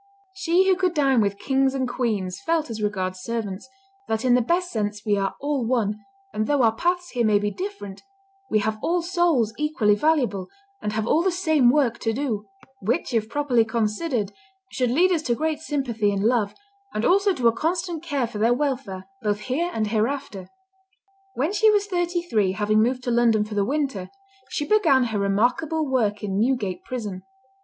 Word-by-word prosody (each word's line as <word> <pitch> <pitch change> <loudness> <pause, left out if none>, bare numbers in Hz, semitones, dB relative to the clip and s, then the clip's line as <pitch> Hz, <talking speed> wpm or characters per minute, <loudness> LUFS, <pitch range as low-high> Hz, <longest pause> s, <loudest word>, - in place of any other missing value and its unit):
'" - - -36
She 375 0 +2
who 380 - +5
could 365 -1 0
dine 270 -5 +3
with 200 -1 0
kings 270 +1 +1
and 260 -1 0
queens, 215 -7 -2
felt 325 -4 0
as 220 -1 -5
regards 185 -3 -2
servants, 225 0 -4 0.4
"that 220 +3 -1
in 250 - +4
the 250 - +4
best 355 +8 0
sense 210 -1 -3
we 210 -1 +2
are 195 -1 -1
all 285 -2 -1
one, 225 -3 0 0.3
and 215 0 -1
though 285 -3 +2
our 225 - +5
paths 355 +7 -1
here 245 -2 0
may 215 -2 +4
be 205 0 -1
different, 365 - -6 0.5
we - - +2
have 215 +1 -2
all 350 0 0
souls 335 - +1
equally 300 -9 +2
valuable, 225 -7 +1 0.3
and 210 - -3
have 220 0 -1
all 310 +7 +3
the 380 - +2
same 315 -8 +3
work 250 -4 +2
to 225 - -1
do; 230 -5 -3 0.3
which, 225 +5 -1
if 220 -1 0
properly 260 -4 +2
considered, 225 +1 -1 0.4
should 250 -2 0
lead 350 +9 +3
us 335 -4 +1
to 240 -6 0
great 310 +2 -1
sympathy 245 -9 -1
and 200 0 -1
love, 220 -3 +1 0.4
and 215 - 0
also 395 +2 +4
to 255 -10 +1
a - - +6
constant 340 +1 -1
care 290 -7 -1
for 225 -2 -7
their 230 +3 +3
welfare, 250 -9 -3 0.2
both 210 -2 -1
here 280 +10 -1
and 215 -6 -1
hereafter." 220 -3 -2 0.9
When 300 +9 0
she 435 +1 +4
was 410 -1 +3
thirty 350 -3 -1
three, 210 - +1
having 215 +1 +2
moved 250 +3 0
to 245 - -1
London 230 -3 +3
for 215 - -8
the 205 -1 +1
winter, 265 -7 -2 0.4
she 295 - -2
began 320 -11 +4
her 205 - 0
remarkable 245 +11 +1
work 215 -6 0
in 195 -1 -1
Newgate 215 -7 0
prison. 210 -7 -5
245 Hz, 195 wpm, -24 LUFS, 210-310 Hz, 0.9 s, a